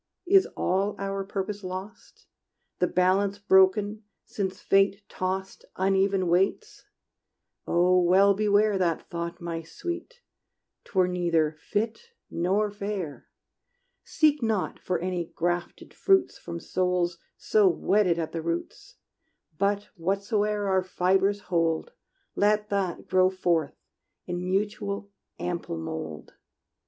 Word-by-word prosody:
Is 385 +1 +5
all 195 +3 0
our 195 0 -3
purpose 200 +1 -4
lost? 185 +4 -8 0.5
The 180 - +3
balance 190 +3 +2
broken, 205 +1 +3 0.2
since 190 -2 -4
Fate 195 +1 +2
tossed 190 +1 -4
Uneven 195 0 +2
weights? 190 - 0 0.8
Oh 180 +1 +4
well 190 +3 +5
beware 205 0 +2
That 170 -3 0
thought, 170 0 -4
my 170 -2 -4
sweet: 350 - -7 0.6
't - - -20
were 185 -1 +4
neither 170 -4 +1
fit 225 - -3 0.2
nor 195 +5 +1
fair! 200 -7 -5 0.8
Seek 300 -2 +2
not 220 -4 -1
for 185 - -1
any 180 -1 -2
grafted 175 +1 -3
fruits 385 -2 +2
From 170 0 -7
souls 180 -1 -1 0.2
so 210 -2 +3
wedded 185 0 +2
at 165 -2 -3
the 165 - -3
roots; 170 +1 -5 0.6
But 200 +1 0
whatsoe'er 205 +3 0
our 190 -1 +3
fibres 190 +2 +1
hold, 165 -3 0 0.4
Let 210 +1 +2
that 195 -3 -2
grow 185 0 +4
forth 175 -5 0 0.5
in 175 0 -4
mutual, 200 0 -2 0.3
ample 175 - -4
mold! 80 -1 -6
190 Hz, 115 wpm, -27 LUFS, 175-205 Hz, 0.8 s, Is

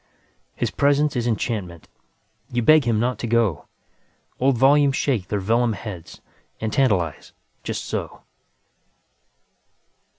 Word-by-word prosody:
His - - -2
presence 145 +1 +2
is 120 -1 -1
enchantment, 105 -7 -3 0.6
You 120 -1 0
beg 155 +1 +5
him 115 -3 +1
not 120 0 -1
to 120 - -3
go; 115 -8 0 0.7
Old 130 -1 +2
volumes 140 +2 +4
shake 120 -12 -1
their 105 - -1
vellum 115 +3 +1
headsAnd 90 -8 -9 0.5
tantalize, 95 - 0 0.3
just - - -4
so. - - -5
115 Hz, 110 wpm, -22 LUFS, 105-135 Hz, 0.7 s, beg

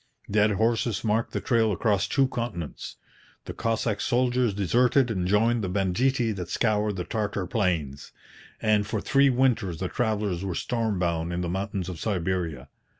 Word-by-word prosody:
Dead 105 0 +3
horses 115 +2 0
marked 110 +1 0
the - - -2
trail 115 -3 +2
across 100 0 +1
two 135 -2 +2
continents. 115 - -5 0.5
The - - -6
Cossack 115 -2 -1
soldiers 125 -1 +1
deserted 120 - +2
and 90 -4 -1
joined 110 +3 +2
the 95 - -2
banditti 110 +6 +1
that 95 -4 -5
scoured 105 -2 +1
the 90 - -3
Tartar 100 -1 -2
plains; 85 - -2 0.5
and 105 -2 +2
for 110 - -2
three 140 +6 +3
winters 120 -9 +1
the 95 +2 -3
travellers 105 -6 -1
were 95 -3 -3
storm 115 -2 -1
bound 85 -1 -1
in 85 +1 -2
the 85 - -2
mountains 95 0 -3
of 90 -4 -6
Siberia. 90 - -2
105 Hz, 160 wpm, -26 LUFS, 90-115 Hz, 0.5 s, Dead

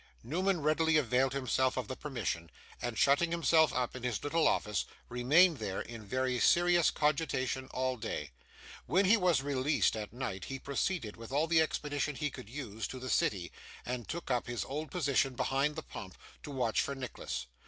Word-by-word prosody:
Newman 180 +6 0
readily 155 +1 +3
availed 130 -1 +2
himself 130 -1 +1
of 130 - -2
the 130 - -4
permission, 115 - -3 0.3
and, 120 -2 -3
shutting 140 +5 +4
himself 165 -2 +4
up 125 -1 -1
in 130 - -6
his 120 -4 -2
little 160 +3 +2
office, 105 -4 +1 0.2
remained 150 +7 +4
there, 95 - -3
in 115 -2 -7
very 130 +3 -1
serious 175 +2 +4
cogitation, 140 -4 0
all 130 0 -1
day. 75 -9 -4 0.6
When 190 +5 +3
he 205 +5 +6
was 180 -9 +2
released 140 0 +1
at 105 -2 -5
night, 110 -6 -4
he 135 - -5
proceeded, 140 - -2
with 115 +1 -10
all 145 +4 +2
the 165 -1 +4
expedition 150 -2 -1
he 150 +1 -2
could 105 - -10
use, 115 -5 -5
to 130 - -7
the 130 0 -4
city, 90 -4 +1 0.3
and 120 -1 -4
took 170 -4 -4
up 125 -1 0
his 120 -1 -3
old 150 +2 -4
position 140 -5 +1
behind 140 +4 0
the - - -5
pump, - - -9 0.2
to - - -9
watch 125 -5 +1
for 140 - -3
Nicholas. 125 - -5
135 Hz, 185 wpm, -32 LUFS, 120-155 Hz, 0.6 s, he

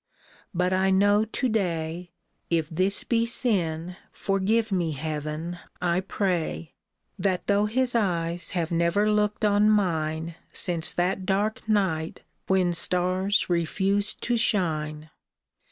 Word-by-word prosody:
But 180 0 0
I 190 +1 +2
know 205 +2 +4
to 240 +4 -2
day 175 -5 -2 0.2
— - - -47
If 155 -1 -5
this 185 +5 +1
be 230 -1 +1
sin, 180 -8 0
forgive 210 +3 0
me, 175 -4 0
Heaven, 155 +3 -4 0.2
I 175 0 +1
pray! 175 - -2 0.2
— - - -40
That 190 -3 0
though 205 +1 +2
his 245 +3 +1
eyes 175 -6 0
have 165 -1 -1
never 170 +5 +2
looked 210 0 +1
on 210 +1 +4
mine 165 -5 0 0.2
Since 170 -3 0
that 185 +1 -1
dark 210 +3 -1
night 175 -7 0 0.3
when 185 -2 +2
stars 185 +4 +1
refused 195 +4 0
to 240 0 +1
shine. 155 -8 0
185 Hz, 130 wpm, -26 LUFS, 165-205 Hz, 0.3 s, know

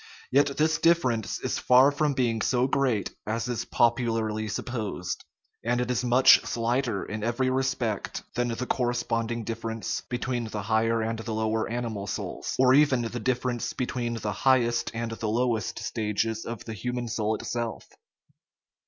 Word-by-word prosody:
Yet 140 +1 +3
this 160 +1 +2
difference 130 - +2
is - - -1
far 130 +3 +6
from 145 -1 0
being 115 -4 +1
so 125 +1 +2
great 130 -6 +1 0.2
as 115 +2 -1
is 120 -2 -2
popularly 115 -2 +1
supposed; 105 -4 -4 0.4
and 120 +1 +1
it 125 0 0
is 125 - 0
much 125 +2 +7
slighter 120 -2 -1
in 105 0 -5
every 125 +3 +1
respect 130 -5 -1
than 120 0 0
the 120 +1 -3
cor 125 -1 0
responding 115 -1 -1
difference 115 0 -3
between 120 -1 -2
the 105 -2 -5
higher 110 +2 +1
and 115 0 -2
the 115 0 -4
low 110 0 0
er 110 - -1
animal 115 -4 -3
souls, - - -4
or 130 0 +5
even 135 -3 +4
the 120 +1 -4
difference 125 0 -1
between 120 -2 -2
the 105 -2 -3
highest 120 +1 +2
and 115 0 -3
the 110 -1 -3
lowest 115 -1 0
stages 110 0 -2
of 115 -2 -6
the 115 - -5
human 125 +3 -3
soul 110 -1 0
itself. 120 0 -4
120 Hz, 160 wpm, -27 LUFS, 110-125 Hz, 0.4 s, much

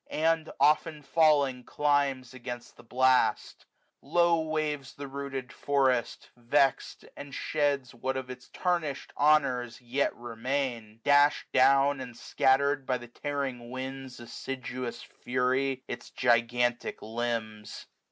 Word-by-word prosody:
And, 160 0 +1
often 150 0 +2
falling, 140 -5 +3
climbs 140 -4 0
against 125 -1 -8
the - - -15
blast« 130 +2 +1 0.4
i8q 140 - -18
Low 170 -1 +4
waves 155 -3 -2
the 140 0 -7
rooted 135 -1 -6
forest, 130 -4 0
vex'd, 135 +3 0
and 140 -1 -9
sheda 140 -4 -1
What 130 +2 -3
of 130 -1 -5
its 125 0 -11
tarnishM 170 -6 -2
honours 130 -6 +2
yet 125 +3 -1
remain 120 -1 -3
j 110 - -27
Dash'd 145 +1 +4
down, 135 +1 +4
and 125 -2 -8
scattered, 140 +1 +2
by 130 -1 +1
the 120 -1 -12
tearing 135 -3 -4
wind's 130 0 -6
Assiduous 120 0 -6
fury, 130 +1 -1
its 120 - -7
gigantic 120 0 +1
limbs. 110 -2 -4
130 Hz, 125 wpm, -29 LUFS, 120-145 Hz, 0.4 s, Low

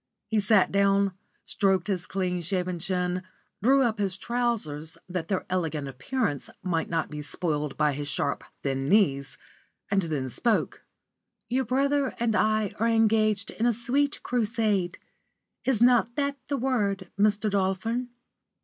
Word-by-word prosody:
He 220 - +1
sat 205 -1 +4
down, 200 0 +3 0.3
stroked 190 -3 +1
his 185 -3 -2
clean 180 -2 -1
shaven 180 0 -1
chin, 180 0 -1 0.4
drew 270 +5 +5
up 225 -3 0
his 195 -2 -1
trousers 205 -11 -2
that 180 -2 -3
their 190 -1 -1
elegant 160 -6 -2
appearance 145 - -2
might 170 -3 -1
not 165 -2 -1
be 150 0 -5
spoiled 150 -1 -2
by 150 -1 +2
his 145 +1 -4
sharp, 145 0 -1 0.2
thin 135 0 -1
knees, 140 -10 +2 0.5
and 200 -1 +3
then 150 -6 -2
spoke: 220 - 0 0.7
"Your 260 +2 +1
brother 275 +3 +1
and 230 -2 +1
I 215 +1 +2
are 230 - +2
engaged 220 -2 +2
in 230 - 0
a 240 - +3 0.5
crusade. 215 -6 0 0.7
Is 240 -4 +3
not 240 -1 +4
that 280 -1 0
the 280 - -1
word, 205 -8 0
Mr. 210 +1 +3
Dolphin?" 200 +6 0
195 Hz, 140 wpm, -27 LUFS, 175-230 Hz, 0.7 s, drew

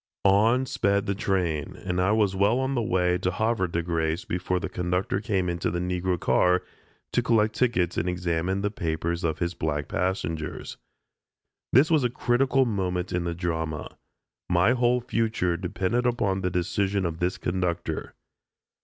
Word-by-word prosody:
On 110 +6 +4
sped 100 -5 +1
the 100 - 0
train, 90 -7 -1
and 90 -1 -2
I 95 +3 +3
was 105 -3 +2
well 100 +5 +3
on 130 +1 0
the 120 - +1
way 90 -5 +1
to 90 - 0
Havre 110 0 0
de 85 0 -2
Grace 80 0 -1
before 90 +1 -1
the - - -3
conductor 90 +2 -1
came 95 -5 0
into 85 -1 -1
the 85 - -2
Negro 90 0 -1
car 90 +2 +3 0.5
to - - +3
collect 110 -3 +2
tickets 100 -9 +1
and 90 - 0
examine 90 +2 -1
the 105 0 -1
papers 85 -2 -2
of 80 -2 0
his 85 +1 -1
black 75 -3 -2
passengers. 80 -4 -3 0.9
This 145 +7 +5
was 155 -4 +4
a 125 - +2
critical 130 +2 +2
moment 90 -5 -2
in 90 -1 -1
the 85 -1 -2
drama. 80 -3 -3 0.5
My 90 +6 +4
whole 125 0 +2
future 110 -7 0
depended 100 +7 -1
upon 100 -6 0
the 90 - 0
decision 95 +2 0
of 85 -1 -3
this 90 +1 0
conductor. 85 -3 -2
90 Hz, 165 wpm, -26 LUFS, 85-110 Hz, 0.9 s, This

